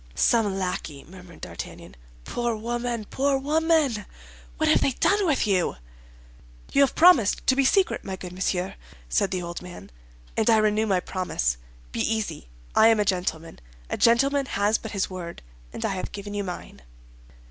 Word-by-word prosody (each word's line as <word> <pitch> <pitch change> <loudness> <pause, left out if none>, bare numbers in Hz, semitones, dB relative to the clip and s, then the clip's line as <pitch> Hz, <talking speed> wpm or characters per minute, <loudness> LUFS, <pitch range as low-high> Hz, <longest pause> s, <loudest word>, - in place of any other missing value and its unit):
"Some 210 -5 +2
lackey," 180 -6 -4
murmured 180 -1 -14
D'Artagnan. 85 -6 -8 0.3
"Poor 240 -1 -1
woman, 235 0 -3
poor 275 +5 +1
woman, 295 - +1 0.5
what - - +1
have - - +4
they 270 - +2
done 405 +8 +2
with 285 -7 +2
you?" 190 -4 +1 1.0
"You 280 - +4
have 275 - +3
promised 320 - +5
to 260 - +4
be 275 - +3
secret, 375 +8 +2
my 190 - -4
good 185 -1 -8
monsieur?" 185 0 -1 0.4
said - - +2
the 185 -2 -3
old 170 0 -6
man. 175 - -11 0.4
"And 220 - +2
I 225 - +6
renew 215 0 +2
my 190 -3 +2
promise. 120 - -1 0.3
Be - - -5
easy, 210 - -2 0.2
I 220 - +6
am 225 -1 +4
a 210 - +2
gentleman. 175 - -2 0.3
A - - +1
gentleman 275 +4 +3
has 205 0 +1
but 220 - -7
his 195 -2 0
word, 175 -2 -7 0.3
and - - -4
I - - 0
have 185 - -5
given 205 0 -7
you 205 0 -2
mine." 180 -2 -7
210 Hz, 170 wpm, -25 LUFS, 180-240 Hz, 1.0 s, I